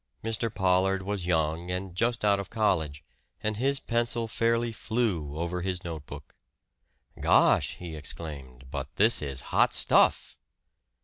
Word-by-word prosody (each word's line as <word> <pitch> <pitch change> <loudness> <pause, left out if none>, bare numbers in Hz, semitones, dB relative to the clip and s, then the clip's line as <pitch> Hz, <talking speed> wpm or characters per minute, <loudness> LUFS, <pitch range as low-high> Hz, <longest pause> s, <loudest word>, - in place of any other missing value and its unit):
Mr. 115 0 -1
Pollard 95 0 +2
was 95 -2 -2
young 80 0 0
and 90 0 -4
just 115 +3 0
out 100 -1 +4
of 100 - -6
college, 80 -10 0 0.4
and 110 -1 -1
his 135 +3 +2
pencil 115 -1 -1
fairly 115 +1 0
flew 105 -11 -2
over 85 +2 -2
his 90 0 -2
notebook. 75 -4 -8 0.8
"Gosh!" - - +3
he 85 -3 -8
exclaimed. 70 -4 -8
"But 70 -1 -5
this 115 +4 +4
is 70 -2 -4
hot - - +4
stuff!" - - +3
90 Hz, 135 wpm, -28 LUFS, 80-110 Hz, 0.8 s, out